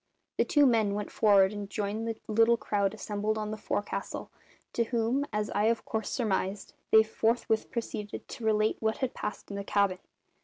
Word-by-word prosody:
The - - +4
two 290 -1 +4
men 220 -5 +3
went 210 0 -4
for'ard 200 -2 +4
and 205 -1 -6
joined 210 +2 -2
the 225 -1 -3
little 225 +2 +4
crowd 200 -3 0
assembled 210 +1 -2
on 215 0 -3
the - - -2
forecastle, 205 -1 -4 0.4
to 235 - +1
whom, 240 +4 0
as 210 0 -2
I 205 +1 +1
of 230 0 +1
course 220 -1 -2
surmised, 200 -4 -1 0.2
they 220 0 +7
forthwith 220 0 0
proceeded 215 -3 -5
to 235 - -8
relate 215 0 +2
what 220 0 0
had 260 -2 -2
passed 210 - -5
in 200 - -4
the 200 - -3
cabin. 200 -2 +1
215 Hz, 185 wpm, -29 LUFS, 205-225 Hz, 0.4 s, they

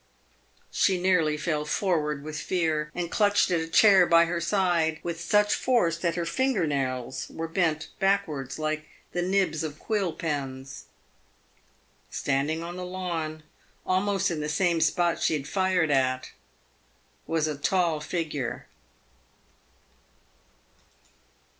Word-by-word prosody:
She 190 -2 +2
nearly 170 -5 +2
fell 150 -1 -1
forward 150 -3 -1
with 155 0 -5
fear, 160 -4 -1
and 175 -1 -3
clutched 205 -2 +3
at 170 - +2
a 160 - -3
chair 190 +1 +6
by 170 0 +6
her 170 0 -2
side 170 -3 +1
with 170 -1 -4
such 210 +4 +3
force 235 -10 +2
that 170 0 -1
her 170 -1 -2
finger 240 +1 +1
nails 130 -3 -2
were 165 0 -5
bent 165 -2 0
backwards 185 -9 0
like 155 0 -2 0.2
the 175 - -1
nibs 180 -4 +1
of 150 -2 -5
quill 200 -4 -1
pens. 135 -5 -5 1.2
Standing 145 +4 -1
on 175 +1 -6
the 180 - -5
lawn, 170 -4 -4 0.4
almost 195 0 +1
in 165 - -2
the 150 0 -3
same 170 +1 +1
spot 170 +1 +1
she - - +2
had 145 -1 -4
fired 185 -4 +1
at, 130 -2 +1 1.0
was 160 -2 +1
a 155 - -2
tall 165 +2 +1
figure. 150 -5 -3
165 Hz, 130 wpm, -27 LUFS, 150-185 Hz, 1.2 s, chair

